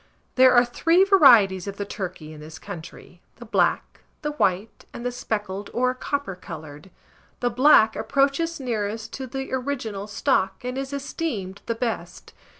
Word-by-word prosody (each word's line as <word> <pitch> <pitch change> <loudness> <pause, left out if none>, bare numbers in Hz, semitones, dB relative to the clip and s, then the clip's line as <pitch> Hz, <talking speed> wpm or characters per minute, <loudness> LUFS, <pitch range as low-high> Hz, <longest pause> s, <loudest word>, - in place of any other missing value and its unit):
There 255 0 +6
are 240 0 +6
three 330 +9 +3
varieties 235 - +6
of 200 0 -6
the 205 - -3
turkey 180 -6 -6
in 155 - -11
this 155 +1 -10
country, 175 -1 -11
the 240 - -12
black, 220 - 0 0.2
the 300 - -1
white, 205 -6 -1
and 240 - -8
the 245 - 0
speckled, 205 -4 -4
or 255 +1 +2
copper 280 -4 -3
coloured. 155 -1 -10 0.5
The 245 -1 0
black 240 -3 +5
approaches 285 +4 0
nearest 220 -3 -3
to 265 -1 -5
the 270 +1 -6
original 245 -7 -3
stock, 205 -3 0
and 250 0 -3
is 270 +1 -4
esteemed 275 - -4
the 230 - -1
best. 220 -8 -5
230 Hz, 155 wpm, -24 LUFS, 195-270 Hz, 0.5 s, There